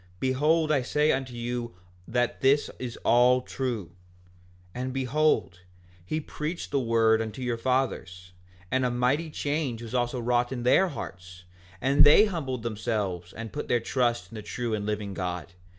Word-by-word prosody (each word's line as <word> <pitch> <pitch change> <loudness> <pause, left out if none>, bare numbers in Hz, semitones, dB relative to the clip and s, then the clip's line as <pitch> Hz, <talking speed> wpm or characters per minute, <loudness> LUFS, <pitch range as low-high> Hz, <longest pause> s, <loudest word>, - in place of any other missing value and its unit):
Behold 150 +5 +2
I 140 -3 +3
say 150 +4 +2
unto 130 -2 -2
you 120 -3 -4 0.3
that 120 0 0
this 140 +2 +3
is 120 -2 -5
all 125 +1 +5
true. 120 -10 -3 0.9
5:13 125 - -3
And 130 0 -3
behold, 135 - +1 0.4
he 155 - -2
preached 155 +2 -5
the 140 - +2
word 115 -2 +3
unto 110 +3 -5
your 120 -1 0
fathers, 105 -8 -1 0.4
and 130 0 +2
a 125 - +2
mighty 125 +7 +1
change 145 -5 -2
was 115 0 -8
also 125 0 0
wrought 120 +1 +1
in 125 -2 -4
their 185 +10 +5
hearts, 90 - -8 0.4
and 135 +5 +5
they 150 +9 +8
humbled 140 - -3
themselves 105 -6 -2
and 115 -3 -7
put - - -4
their 120 - +2
trust 120 0 0
in - - -10
the - - -5
true 115 +2 -3
and 105 -1 -2
living 105 -2 -2
God. 90 -2 -4
120 Hz, 165 wpm, -27 LUFS, 110-135 Hz, 0.9 s, they